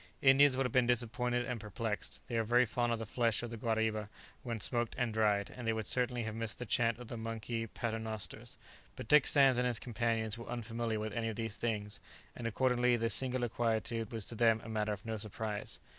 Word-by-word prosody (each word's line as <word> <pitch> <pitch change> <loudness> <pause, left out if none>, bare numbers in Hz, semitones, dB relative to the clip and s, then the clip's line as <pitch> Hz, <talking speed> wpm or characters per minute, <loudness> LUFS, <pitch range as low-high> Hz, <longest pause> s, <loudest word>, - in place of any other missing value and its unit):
Indians 135 0 +6
would 135 - +1
have 125 - -2
been 125 -2 +4
disappointed 120 +1 0
and 120 -1 -3
perplexed; 105 +1 -4
they 120 - -5
are 115 - +2
very 120 +3 +4
fond 120 +1 0
of 115 - +1
the 115 - -5
flesh 115 +1 0
of 120 - -5
the - - -4
guariba 110 -2 -1 0.3
when 115 -2 -4
smoked 120 +1 +1
and 120 -3 0
dried, 105 -2 +1
and 120 -2 -6
they 115 - +2
would 110 -1 -3
certainly 125 0 +1
have 110 -1 -4
missed 115 0 -3
the 125 - -5
chant 115 0 +1
of 125 -1 -10
the 120 - -6
monkey 115 0 -4
"paternosters;" 110 -2 -4 0.4
but - - -8
Dick 150 +1 +6
Sands 135 -3 +6
and 125 - +2
his 120 -2 0
companions 115 -1 -1
were 115 - -8
unfamiliar 115 -1 -3
with 110 0 -4
any 115 -1 -1
of 110 - -4
these 115 -1 -2
things, 105 -3 -2 0.4
and 120 - -4
accordingly 125 +1 +2
the 115 0 0
singular 130 -2 +2
quietude 115 -1 -1
was 110 -4 -2
to - - -5
them 115 -1 +3
a - - -9
matter 110 -1 -1
of 105 +2 -5
no 110 -1 -3
surprise. 105 0 -4
115 Hz, 220 wpm, -34 LUFS, 110-120 Hz, 0.4 s, Indians